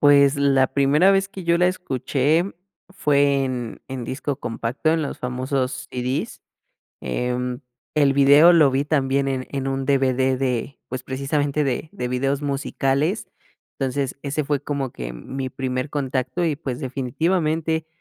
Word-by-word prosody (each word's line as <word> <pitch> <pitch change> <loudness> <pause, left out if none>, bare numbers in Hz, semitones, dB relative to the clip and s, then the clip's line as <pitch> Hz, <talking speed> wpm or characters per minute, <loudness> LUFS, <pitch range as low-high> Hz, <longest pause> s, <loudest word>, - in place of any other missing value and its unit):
Pues, 140 -1 +6
la 135 -2 +3
primera 145 +7 +4
vez 195 0 +2
que 195 -2 -9
yo 170 0 +3
la 180 - +4
escuché 150 -2 0 0.4
fue 140 -6 +2
en 125 -3 -4
en 130 -2 -5
disco 135 +3 -3
compacto, 120 +4 -2
en 160 -1 +1
los 145 - -4
famosos 130 0 -2
CDs. 125 +2 -3 0.6
Eh, 125 - -2 0.6
el 145 -2 +4
video 140 +5 +7
lo 155 -5 +6
vi 135 +2 +1
también 140 -2 +1
en 130 -1 -2
en 135 -1 -2
un 135 0 -2
DVD 130 -1 +2
de, 130 0 -2
pues, 130 +1 -5
precisamente 140 +2 -1
de 135 +3 -1
de 125 0 -4
videos 135 +3 0
musicales, 140 +5 0 0.5
entonces 135 0 -1
ese 145 +2 -1
fue 145 -1 0
como 140 -3 -3
que - - -6
mi 130 - -5
primer 130 +1 -3
contacto 135 +3 -2
y, 155 -4 0
pues, 135 -3 -5
definitivamente 160 +4 -1
140 Hz, 150 wpm, -22 LUFS, 130-150 Hz, 0.6 s, video